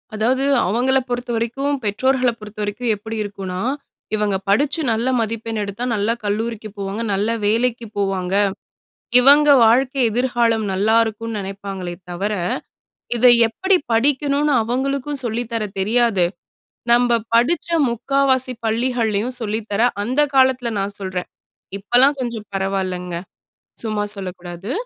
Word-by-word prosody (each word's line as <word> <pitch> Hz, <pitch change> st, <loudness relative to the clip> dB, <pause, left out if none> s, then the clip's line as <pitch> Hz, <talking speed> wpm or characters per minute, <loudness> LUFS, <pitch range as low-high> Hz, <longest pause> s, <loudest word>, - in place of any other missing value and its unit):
அதாவது, 250 Hz, +5 st, +1 dB, 0.2 s
அவங்கள 250 Hz, +6 st, +2 dB
பொறுத்தவரைக்கும், 245 Hz, +3 st, -2 dB
பெற்றோர்கள 255 Hz, +5 st, +1 dB
பொறுத்தவரைக்கும், 215 Hz, +2 st, -3 dB
எப்படி 220 Hz, +2 st, -7 dB
இருக்குனா. 190 Hz, -2 st, -5 dB, 0.5 s
இவங்க 210 Hz, -2 st, 0 dB
படுச்சு 285 Hz, +9 st, +2 dB
நல்ல 230 Hz, +2 st, 0 dB
மதிப்பெண் 225 Hz, 0 st, -3 dB
எடுத்தா, 200 Hz, +4 st, -5 dB
நல்ல 205 Hz, +1 st, 0 dB
கல்லூரிக்கு 215 Hz, +1 st, -3 dB
போவாங்க. 200 Hz, +2 st, -4 dB
நல்ல 205 Hz, +3 st, 0 dB, 0.2 s
வேலைக்கு 230 Hz, +2 st, +1 dB
போவாங்க. 195 Hz, -1 st, -1 dB, 0.8 s
இவங்க 290 Hz, +3 st, +6 dB, 0.2 s
வாழ்க்கை 260 Hz, +4 st, +3 dB
எதிர்காலம், 235 Hz, -1 st, +1 dB
நல்லாயிருக்கும்னு 220 Hz, +2 st, +1 dB
நினைப்பாங்களே 195 Hz, -2 st, -6 dB, 0.2 s
தவர, 200 Hz, +4 st, -2 dB, 0.8 s
இத 245 Hz, -, +2 dB, 0.2 s
எப்படி 380 Hz, -, +1 dB, 0.2 s
படிக்கணும்னு 285 Hz, +4 st, +2 dB
அவங்களுக்கு, 270 Hz, +4 st, -2 dB
சொல்லித்தர 230 Hz, 0 st, -2 dB, 0.2 s
தெரியாது. 215 Hz, -2 st, +2 dB, 0.7 s
நம்ம 240 Hz, -1 st, +4 dB, 0.2 s
படுச்ச 285 Hz, +10 st, +2 dB, 0.2 s
3/4வாசி 260 Hz, +2 st, +1 dB
பள்ளிகள்லயும் 230 Hz, 0 st, 0 dB
சொல்லி 220 Hz, 0 st, -2 dB
தர, 205 Hz, +1 st, -1 dB, 0.2 s
அந்த 255 Hz, +7 st, 0 dB
காலத்தில 260 Hz, -2 st, +3 dB
நான் 200 Hz, +1 st, -3 dB
சொல்றே. 185 Hz, -2 st, -3 dB, 0.6 s
இப்பலாம் 250 Hz, +8 st, +3 dB
கொஞ்சம், 235 Hz, -4 st, -4 dB
பரவாயில்லங்க. 185 Hz, -2 st, -2 dB, 0.7 s
சும்மா 215 Hz, -2 st, -1 dB
சொல்லக்கூடாது. 180 Hz, +1 st, -7 dB
225 Hz, 110 wpm, -20 LUFS, 205-250 Hz, 0.8 s, இவங்க